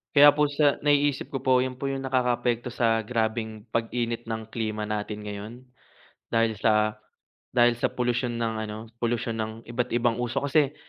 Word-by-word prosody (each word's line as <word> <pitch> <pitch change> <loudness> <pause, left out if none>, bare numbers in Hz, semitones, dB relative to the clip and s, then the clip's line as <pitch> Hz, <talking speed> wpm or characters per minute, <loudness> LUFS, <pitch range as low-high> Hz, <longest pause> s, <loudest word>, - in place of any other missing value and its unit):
Kaya 145 0 +9
po 150 - +3
siya 145 0 +3
naiisip 145 -1 +2
ko 135 - -2
po, 130 -1 +3
'yon 130 -1 -5
po 140 - -2
'yong 135 0 -3
nakakaapekto 125 -2 0
sa 115 -2 +1
grabeng 110 -1 -2
pag-init 115 0 -2
ng 110 -1 -3
klima 110 -2 -2
natin 105 0 -4
ngayon. 105 +2 -6 0.7
Dahil 115 -1 +1
sa, 110 +1 +2 0.6
dahil 120 -1 +4
sa - - +2
polusyon 120 0 -1
ng 115 -1 -2
ano, 105 0 -6 0.2
polusyon 115 -1 -1
ng 110 0 -2
iba't 120 0 -2
ibang 120 -1 +1
usok, 125 +3 -2
kasi, 150 -1 +3
120 Hz, 165 wpm, -26 LUFS, 110-130 Hz, 0.7 s, Kaya